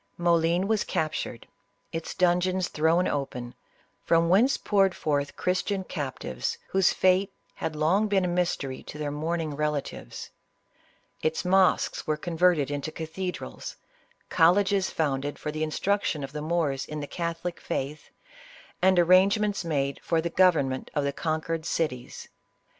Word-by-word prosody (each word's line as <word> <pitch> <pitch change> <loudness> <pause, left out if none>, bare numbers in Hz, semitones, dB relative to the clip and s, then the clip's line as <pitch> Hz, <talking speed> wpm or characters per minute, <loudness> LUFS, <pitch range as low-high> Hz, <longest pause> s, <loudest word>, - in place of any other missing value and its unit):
Moclin 170 +1 +2
was 220 -1 +1
captured; 155 -6 -3 0.5
its 165 0 -5
dungeons 180 0 +2
thrown 160 +4 +2
open, 125 -4 -3 0.5
from 165 0 +3
whence 230 +10 +4
poured 195 -2 +2
forth 145 -2 -1
Christian 190 +2 -1
captives, 130 - -4
whose 190 -1 +3
fate 190 +2 +2 0.2
had 155 - -4
long 175 +8 +2
been 195 -3 +2
a - - 0
mystery 175 -7 -1
to - - -9
their 150 -1 -3
mourning 155 0 -2
rela 150 0 0
tives; - - -9 0.9
its 160 +3 -1
mosques 190 0 +2
were 155 -1 +1
converted 165 -3 +2
into 145 +2 -3
cathedrals, 170 +4 -5 0.5
col 170 +1 +5
leges 200 -1 +1
founded 145 -2 -1
for 150 - -4
the 155 +1 -5
instruction 155 0 0
of 135 - -6
the 150 0 -5
Moors 155 -4 0
in 150 0 -6
the 145 - -4
catholic 170 +2 -4
faith, 145 +3 -4 0.7
and 185 0 +4
arrangements 195 +4 +4
made 140 -4 -1
for 165 - +1
the 170 +1 -2
govern 170 -7 +4
ment 130 0 -5
of 145 - +1
the 140 0 -1
conquered 160 +1 -2
cities. 150 -7 -3
165 Hz, 145 wpm, -27 LUFS, 150-185 Hz, 0.9 s, col